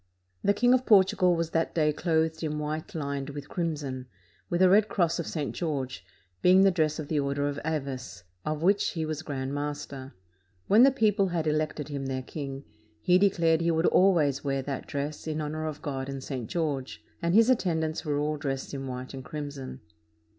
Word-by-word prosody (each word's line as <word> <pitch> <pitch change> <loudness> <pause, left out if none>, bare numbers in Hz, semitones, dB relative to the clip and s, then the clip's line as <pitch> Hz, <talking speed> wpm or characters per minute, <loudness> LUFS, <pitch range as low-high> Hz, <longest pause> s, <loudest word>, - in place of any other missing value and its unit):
The 200 - +3
King 245 +3 +4
of 255 0 +1
Portugal 190 -4 +5
was 165 -1 -2
that 165 0 0
day 150 -2 +3
clothed 160 0 0
in 150 -2 -2
white 150 +1 -3
Hned 140 -2 -4
with 145 0 -7
crimson, 145 -7 -3 0.4
with 175 +2 +2
a - - +8
red 205 +3 +5
cross 175 -5 +1
of 170 - -3
St. 150 -4 -3
George, 140 -6 -3 0.4
being 185 +1 +6
the 195 - +6
dress 155 -4 +1
of 155 - -5
the 150 -1 0
Order 140 0 0
of 145 0 -3
Avis, 135 - -4 0.2
of 155 +1 -3
which 200 +3 +3
he 160 -2 -2
was 155 0 -3
grand 135 -3 -4
master. 145 -2 -5 0.5
When 210 +4 +5
the 270 - +8
people 215 -6 +2
had 170 -3 -1
elected 155 -1 -1
him 140 -2 -4
their 130 -1 -3
king, 135 -1 -6 0.4
he 180 +9 +4
declared 170 -4 +3
he 170 - +1
would 160 +1 +2
always 160 -8 +3
wear 135 -1 -1
that 135 -1 -5
dress 145 +2 -4
in 155 0 -2
honor 155 +1 -3
of 150 -1 -6
God 135 -2 -3
and 135 -1 -5
St. 130 -6 -5
George, 145 -6 -3 0.2
and 170 +2 +1
his 230 +3 +6
at 255 - +3
tendants 160 -3 -1
were 150 -3 -1
all 150 +1 -1
dressed 135 -2 -4
in 135 -1 -4
white 130 +1 -6
and 135 -1 -7
crimson. 145 -2 -7
155 Hz, 200 wpm, -28 LUFS, 140-170 Hz, 0.5 s, a